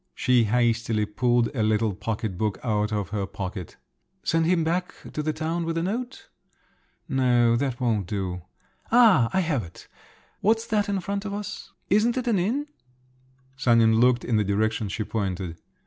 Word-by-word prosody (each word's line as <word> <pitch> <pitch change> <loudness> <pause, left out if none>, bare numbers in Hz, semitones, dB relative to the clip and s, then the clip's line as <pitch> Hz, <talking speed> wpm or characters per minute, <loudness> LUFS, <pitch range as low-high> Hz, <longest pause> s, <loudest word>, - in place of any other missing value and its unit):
She 125 -2 +3
hastily 115 -1 +1
pulled 120 +4 +1
a 115 - 0
little 110 0 +1
pocket 105 0 -3
book 105 +2 -1
out 105 -2 0
of 105 -4 -2
her 100 -2 -2
pocket. 95 -3 -6 0.5
"Send 165 0 +1
him 175 -2 +2
back 175 +3 -1 0.2
to 155 - -2
the 155 +1 -1
town 165 +2 -2
with 165 0 -2
a 165 - 0
note? 245 +7 -4 0.8
No… 120 -3 +3
that 125 0 -1
won't 110 -7 0
do. 95 -3 -3 0.5
Ah! 220 - +6
I 190 - +2
have 155 -8 0
it! 85 -3 -12 0.5
What's 225 +2 +2
that 210 -2 0
in 195 -2 0
front 200 +2 -3
of 200 -1 -4
us? 210 0 -7 0.2
Isn't 225 +5 +3
it 255 - -1
an 225 -6 +2
inn?" 240 +11 0 0.9
Sanin 115 -4 +4
looked 125 0 +3
in 115 - +1
the 105 - +2
direction 105 +1 0
she 110 +3 -3
pointed. 95 -6 -3
120 Hz, 170 wpm, -25 LUFS, 105-175 Hz, 0.9 s, Ah